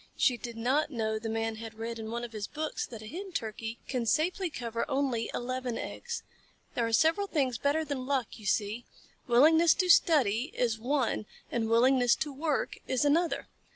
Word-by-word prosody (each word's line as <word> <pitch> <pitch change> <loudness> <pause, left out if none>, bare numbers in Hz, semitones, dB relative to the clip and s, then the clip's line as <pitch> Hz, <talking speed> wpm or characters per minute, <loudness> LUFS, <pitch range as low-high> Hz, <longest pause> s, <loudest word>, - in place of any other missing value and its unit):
She 250 - +4
did 235 0 -7
not 265 +7 +1
know 220 -5 -1
the 225 0 -4
Man 225 0 -2
had 225 0 -8
read 230 +1 -5
in 220 0 -5
one 235 +1 -3
of 240 - -6
his 215 -2 -4
books 310 0 -3
that 225 -3 -9
a - - -9
Hen 370 - -7
Turkey 225 -2 -4
can 245 -3 -2
safely 345 - +1
cover 235 -5 -3
only 265 -4 0
eleven 250 -1 -3
eggs. 475 -1 -5 0.5
There 235 -1 0
are - - -3
several 330 - +3
things 265 - 0
better 300 +3 +1
than 265 -3 -4
luck, 265 -5 -1
you 210 - -7
see. 210 +4 0 0.4
Willingness 315 +7 +6
to 365 -2 0
study 265 - +4
is 230 -3 0
one 245 -3 0 0.2
and 225 -2 -1
willingness 245 +1 +5
to 295 -2 -3
work 295 +1 -1
is 260 +2 +1
another. 325 +4 +2
245 Hz, 190 wpm, -30 LUFS, 225-295 Hz, 0.5 s, Willingness